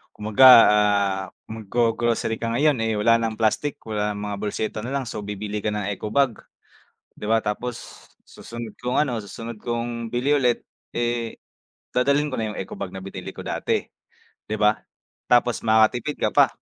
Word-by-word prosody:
Kumbaga 110 +5 +3 0.3
ah 100 -2 +2 0.3
mag-go-grocery 115 +1 0
ka 115 - -3
ngayon 145 -1 +3
eh 110 - 0
wala 115 +2 +4
ng 115 -1 -2
plastic 115 +7 0
wala 105 -1 -2
ng 100 - -6
mga 100 - -3
bolseta 105 +1 -3
nalang 135 +5 -2
so - - -5
bibili 105 +1 -4
ka 105 0 -2
ng 105 -1 -2
eco 100 +1 -5
bag, 130 0 +1 0.8
'di 105 - -5
ba 115 0 +2
tapos 120 +3 -5 0.2
susunod 115 -2 -9
kong 125 +1 -2
ano, 120 -6 -2
susunod 115 +2 -8
kong 120 0 -3
bili 125 +5 -1
ulit 125 -2 +1 0.3
eh 120 -1 -1 0.5
dadalhin 140 +4 +2
ko 130 - -4
na 110 -2 -2
yung - - -7
eco 95 - -8
bag 95 -1 -5
na 95 - -7
binili 95 - -7
ko - - -8
dati, - - -1 0.7
'di 110 - -3
ba, 105 0 +3 0.5
tapos 120 0 +3
makatipid 110 +6 +3
ka - - 0
pa. - - +5
115 Hz, 170 wpm, -23 LUFS, 105-120 Hz, 0.8 s, pa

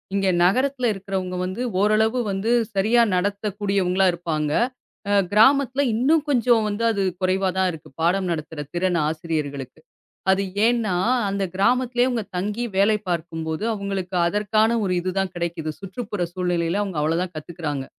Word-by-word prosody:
இங்க 195 -1 +1 0.2
நகரத்துல 255 +7 +2
இருக்கறவங்க 190 -2 -4
வந்து 185 +6 -4 0.2
ஓரளவு 220 +4 +2
வந்து 195 +4 -2 0.3
சரியா 220 +5 +4
நடத்தக்கூடியவங்களா 195 -1 0
இருப்பாங்க. 160 -3 -2 0.6
அ - - +2 0.2
கிராமத்துல 265 +5 +4
இன்னும் 290 +7 +3
கொஞ்சம் 240 -4 +3
வந்து 210 +2 -3
அது 200 -3 -1 0.2
குறைவாதான் 185 0 +1
இருக்கு. 160 -3 -11
பாடம் 185 +3 +2
நடத்துற 155 -1 -4
திறன் 175 0 +1
ஆசிரியர்களுக்கு. 155 -4 -4 0.5
அது 190 - +2 0.2
ஏனா 230 -5 +1 0.3
அந்தப் 195 -2 -2
கிராமத்துலயே 245 +4 +2
அவுங்க 235 -3 -1
தங்கி 210 +5 -2
வேலை 210 +2 +4
பார்க்கும் 165 -1 -3
போது 160 +5 -3
அவுங்களுக்கு 195 -3 -4
அதற்கான 215 +4 +2
ஒரு 185 -2 0
இதுதான் 185 +1 -1
கிடைக்குது. 170 -2 -3
சுற்றுப்புற 200 0 -4
சூழ்நிலைல 180 +1 0
அவுங்க 190 -6 -4
அவ்வளவுதான் 170 +4 -1
கத்துக்குறாங்க. 155 -3 -5
195 Hz, 135 wpm, -23 LUFS, 175-215 Hz, 0.6 s, சரியா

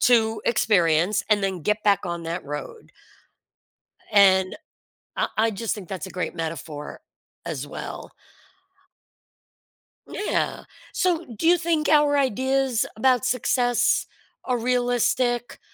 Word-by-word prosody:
to 225 -3 +3
experience 180 -4 +2
and 205 -2 +3
then 190 -3 -2
get 210 +5 0
back 200 -2 +3
on 170 -1 -4
that 170 +2 -4
road. 150 - -8 1.2
And 190 -2 +5 0.6
I - - 0
I 225 +1 +3
just 220 +2 -2
think 195 -5 -9
that's 185 -5 -5
a - - -10
great 180 -1 -4
metaphor 160 -2 -6 0.4
as - - -4
well. - - -8 2.0
Yeah. 420 - -2 0.3
So, 350 -3 0
do 235 +6 -3
you 350 +1 +6
think 330 -2 0
our 295 -1 +4
ideas 265 -1 +1
about 250 +2 +2
success 245 -1 +1 0.4
are 250 -1 0
realistic? 245 0 0
225 Hz, 120 wpm, -24 LUFS, 190-255 Hz, 2.0 s, you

